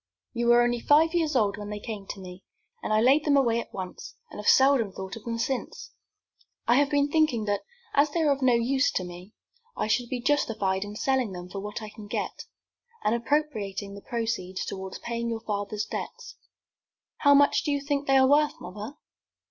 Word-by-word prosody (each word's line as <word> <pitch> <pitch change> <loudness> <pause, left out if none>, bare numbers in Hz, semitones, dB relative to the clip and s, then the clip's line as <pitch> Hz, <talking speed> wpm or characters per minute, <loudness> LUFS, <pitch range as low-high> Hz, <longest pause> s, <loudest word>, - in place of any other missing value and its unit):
"You 235 -1 -1
were 240 0 +6
only 240 0 +1
five 310 +6 +4
years 320 -4 +1
old 205 -5 +2
when 205 0 -7
they 210 0 -5
came 205 -2 -7
to - - -6
me, 185 0 -10 0.4
and - - -4
I 215 0 +4
laid 270 +5 +5
them 290 -2 +3
away 235 -4 +3
at - - -7
once, 185 -1 -7 0.2
and - - -9
have 210 - -5
seldom 265 -6 +5
thought 190 0 -7
of 225 - -11
them 230 -1 -2
since. 255 +2 -3 0.8
I 240 +2 +5
have 285 0 +3
been 285 -1 +2
thinking 305 -9 +2
that, 205 -1 0 0.3
as 285 +2 +4
they 330 +3 -1
are 300 -2 +3
of 280 0 0
no 255 -2 +4
use 260 +4 +2
to 185 - -1
me, 180 +3 -10 0.4
I - - 0
should 240 +2 0
be 255 - -2
justified 220 -8 0
in 205 0 -8
selling 255 -3 0
them 180 0 -8
for 195 - -6
what 210 +2 -6
I 215 - -6
can 215 -1 -11
get, - - -4 0.6
and 210 - +2
appropriating 225 -7 -1
the 200 - -9
proceeds 220 -6 -3
toward 190 -1 -6
paying 235 0 -3
your 225 -1 -3
father's 210 0 -3
debts." 480 0 -7 0.8
"How 285 -1 +5
much 285 0 +4
do - - -2
you 285 - +1
think 285 0 -2
they 270 0 +5
are 265 0 +6
worth, 295 +2 +3
mother?" 210 +9 -8
235 Hz, 210 wpm, -27 LUFS, 205-280 Hz, 0.8 s, were